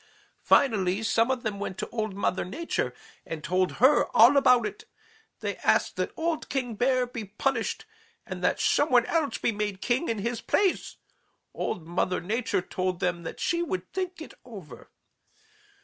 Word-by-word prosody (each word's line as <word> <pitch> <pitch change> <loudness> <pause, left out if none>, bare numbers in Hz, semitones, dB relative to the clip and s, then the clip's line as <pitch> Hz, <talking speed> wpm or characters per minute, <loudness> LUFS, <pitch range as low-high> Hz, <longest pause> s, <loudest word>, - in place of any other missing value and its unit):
Finally 205 -6 +3
some 225 +2 +2
of 255 -2 -1
them 210 -2 -3
went 195 -2 -4
to - - -3
Old 215 -4 -3
Mother 190 -2 0
Nature 330 - -2 0.3
and 160 -2 -7
told 185 +2 +1
her 265 +4 +5
all 240 +6 +8
about 250 -3 +5
it; 420 +2 -6 0.6
they - - -3
asked - - +2
that - - -1
old 325 -1 -2
King 255 -3 -2
Bear 255 +3 +2
be 245 -2 -6
punished 225 +4 -2 0.4
and - - -7
that - - +2
some 290 +2 +2
one 245 -3 +5
else 320 -4 0
be - - 0
made 205 -2 -3
king 250 +10 0
in 225 - -1
his 235 +3 -3
place. 390 -3 0 0.6
Old 165 - -3
Mother 180 +2 -1
Nature 215 +1 -1
told 185 -1 -2
them 180 -2 -1
that 165 - -7
she 340 0 0
would 185 - -4
think 365 -3 -3
it - - -12
over. 210 -10 -11
230 Hz, 170 wpm, -27 LUFS, 190-270 Hz, 0.6 s, all